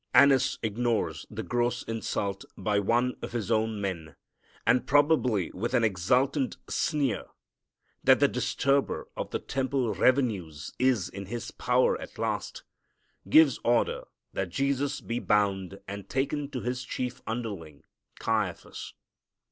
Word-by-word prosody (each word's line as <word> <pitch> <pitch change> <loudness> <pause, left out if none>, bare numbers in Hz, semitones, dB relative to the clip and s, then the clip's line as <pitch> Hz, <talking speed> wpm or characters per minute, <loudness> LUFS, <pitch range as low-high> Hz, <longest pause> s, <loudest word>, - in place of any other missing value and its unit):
Annas 140 -2 +6
ignores 115 +1 -1
the - - -5
gross 120 0 0
insult 100 -3 -3
by 105 -1 +1
one 120 +5 +2
of - - -6
his 115 -2 -2
own 110 -1 +1
men, 85 -6 -4 0.5
and, 125 - +3
probably 140 - +3
with 120 +6 -2
an 120 - +3
exultant 125 - +1
sneer 145 -6 0 0.8
that - - +6
the - - +5
disturber 140 0 0
of - - -4
the - - -1
temple 130 -3 -1
revenues 100 - +1
is 125 -7 +2
in 100 0 -8
his 120 +3 -5
power 125 +1 +2
at - - -10
last, - - -3 0.7
gives 150 0 +6
order 120 0 +1 0.3
that 95 -1 -2
Jesus 140 +7 0
be 120 +1 -3
bound 100 -3 +1
and 100 0 -7
taken 140 +2 -1
to 130 -4 -4
his 125 +1 -2
chief 125 0 -4
underling, 100 -11 -5 0.3
Caiaphas. 110 -5 -2
120 Hz, 130 wpm, -28 LUFS, 100-130 Hz, 0.8 s, Annas